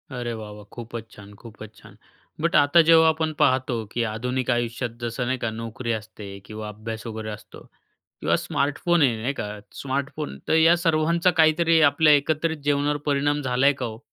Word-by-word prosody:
अरे 120 -1 -3
वाह 105 -1 -8
वाह 105 - -12
खूपच 115 -1 -8
छान! 105 0 -13
खूपच 110 -1 -12
छान! - - -17 0.4
बट 170 +1 0
आता 150 +3 +6
जेव्हा 160 -1 +7
आपण 160 0 -1
पाहतो 130 -3 +1
की 120 - -1
आधुनिक 125 +3 -3
आयुष्यात 120 0 -2
जसं 120 +1 -3
नाही 130 +1 -1
का 115 - -2
नोकरी 115 +2 -5
असते 105 -1 -7 0.2
किंवा 110 0 -7
अभ्यास 110 +2 -7
वगैरे 110 -1 -6
असतो 105 - -11 0.6
किंवा - - +2
स्मार्टफोन 150 +4 0
आहे, 120 -5 +3
नाही 135 +4 -1
का. 105 -4 -4 0.2
स्मार्टफोन 140 +2 -4
तर - - +3
या 165 +2 +5
सर्वांचा 170 +1 +2
काहीतरी 160 +1 +4
आपल्या 150 +1 +4
एकत्रित 155 +3 +1
जीवनावर 145 0 +1
परिणाम 145 +1 +1
झाला 130 +1 +1
आहे 145 - +5
का 125 - -2
ओ? 110 0 -7
130 Hz, 180 wpm, -24 LUFS, 115-155 Hz, 0.6 s, जेव्हा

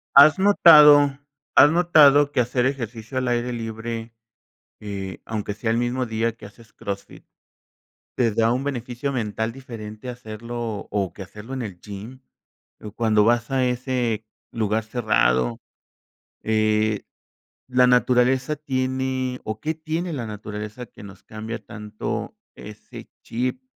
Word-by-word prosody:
¿Has 155 +5 +8
notado 150 -7 +7 0.4
has 145 - +8
notado 145 -4 +5
que - - 0
hacer 125 +1 +1
ejercicio 120 -2 -5
al 130 0 0
aire 120 0 0
libre, 115 0 -5 0.7
eh, 100 -2 -6
aunque 105 -2 -4
sea 110 +2 -2
el 115 - +1
mismo 120 +1 -1
día 115 +1 -1
que 115 - -12
haces 110 +2 -17
Crossfit, 100 0 -7 0.9
te 120 -3 +2
da 115 +2 +2
un 130 +2 -2
beneficio 125 0 -3
mental 110 -1 -2
diferente 115 -3 -9
hacerlo 115 -2 -6
o 100 -4 -1
que 95 - -9
hacerlo 105 +6 -10
en 135 - -3
el 95 -5 -7
gym?, 105 +5 -9 0.6
o 105 - -8
cuando 110 -2 +2
vas 120 +1 +2
a 135 -1 +1
ese 125 -3 -1 0.3
lugar 110 -1 -1
cerrado, 85 - +1 0.8
eh, 110 -1 +1 0.7
la 125 0 +4
naturaleza 125 +3 +3
tiene 130 -2 -2
o, 110 0 -4
¿qué 160 +1 -2
tiene 160 +2 -3
la 125 -5 -4
naturaleza 105 +2 -7
que - - -15
nos 100 -1 -12
cambia 110 +1 -7
tanto 105 +1 -5 0.2
ese - - -11
chip?, 125 +2 -3
120 Hz, 135 wpm, -23 LUFS, 110-130 Hz, 0.9 s, Has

